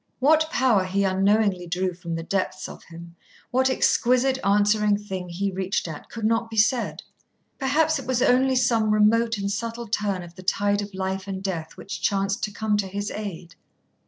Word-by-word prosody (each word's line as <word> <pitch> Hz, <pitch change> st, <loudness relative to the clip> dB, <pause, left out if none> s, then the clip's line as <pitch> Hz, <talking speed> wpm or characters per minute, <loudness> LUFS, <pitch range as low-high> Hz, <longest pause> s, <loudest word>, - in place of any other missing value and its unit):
What 315 Hz, +4 st, +3 dB
power 245 Hz, -9 st, +3 dB
he 195 Hz, +2 st, 0 dB
unknowingly 195 Hz, -1 st, +2 dB
drew 180 Hz, +1 st, -1 dB
from 170 Hz, -1 st, -6 dB
the 165 Hz, -, -4 dB
depths 185 Hz, +1 st, -2 dB
of -, -, -11 dB
him, 170 Hz, 0 st, -12 dB, 0.4 s
what 260 Hz, +1 st, +3 dB
exquisite 260 Hz, +1 st, +2 dB
answering 205 Hz, +1 st, +3 dB
thing 190 Hz, -3 st, -6 dB
he 195 Hz, +3 st, -2 dB
reached 190 Hz, 0 st, -2 dB
at, 155 Hz, -3 st, -8 dB
could 225 Hz, -2 st, -5 dB
not 230 Hz, +1 st, +1 dB
be 225 Hz, -, -7 dB
said. 225 Hz, +3 st, +1 dB, 0.6 s
Perhaps 300 Hz, +3 st, +2 dB
it 270 Hz, -, -9 dB
was 260 Hz, -2 st, +1 dB
only 260 Hz, +1 st, +3 dB
some 235 Hz, -3 st, +2 dB
remote 225 Hz, +2 st, +3 dB
and 200 Hz, 0 st, -2 dB
subtle 230 Hz, +3 st, -4 dB
turn 200 Hz, -3 st, -1 dB
of 170 Hz, -1 st, -12 dB
the 185 Hz, -, -12 dB
tide 205 Hz, +2 st, +1 dB
of 205 Hz, -1 st, -7 dB
life 190 Hz, 0 st, -3 dB
and 190 Hz, -1 st, -5 dB
death 170 Hz, -5 st, -4 dB
which 195 Hz, -, -7 dB
chanced 195 Hz, +2 st, 0 dB
to 210 Hz, -, -8 dB
come 210 Hz, 0 st, 0 dB
to 200 Hz, -2 st, -1 dB
his 200 Hz, +2 st, -4 dB
aid. 185 Hz, -5 st, -6 dB
205 Hz, 190 wpm, -24 LUFS, 190-230 Hz, 0.6 s, What